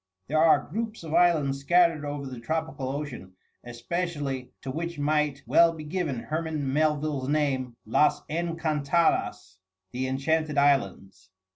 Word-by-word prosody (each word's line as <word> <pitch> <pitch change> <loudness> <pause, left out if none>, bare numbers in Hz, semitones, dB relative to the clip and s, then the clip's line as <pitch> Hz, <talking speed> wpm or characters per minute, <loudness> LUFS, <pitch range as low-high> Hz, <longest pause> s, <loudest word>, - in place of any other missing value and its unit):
There 155 +3 +1
are 160 0 +4
groups 220 +3 -4
of 160 -1 -6
islands 155 -7 +3
scattered 165 +1 +3
over 145 -1 -4
the 130 -2 -7
tropical 155 0 -3
ocean, 135 -9 -6 0.3
especially, 135 0 -4
to 135 - -4
which 170 +3 -4
might 150 -1 0
well 170 0 +5
be 160 -2 -8
given 150 -6 -3
Herman 155 -4 -3
Melville's 150 -3 0
name, 135 -5 0
"Las 150 +7 +2
Encantadas," 160 - 0 0.3
the 130 +1 -2
Enchanted 150 +3 0
Islands. 100 -9 +1
150 Hz, 130 wpm, -27 LUFS, 135-160 Hz, 0.3 s, well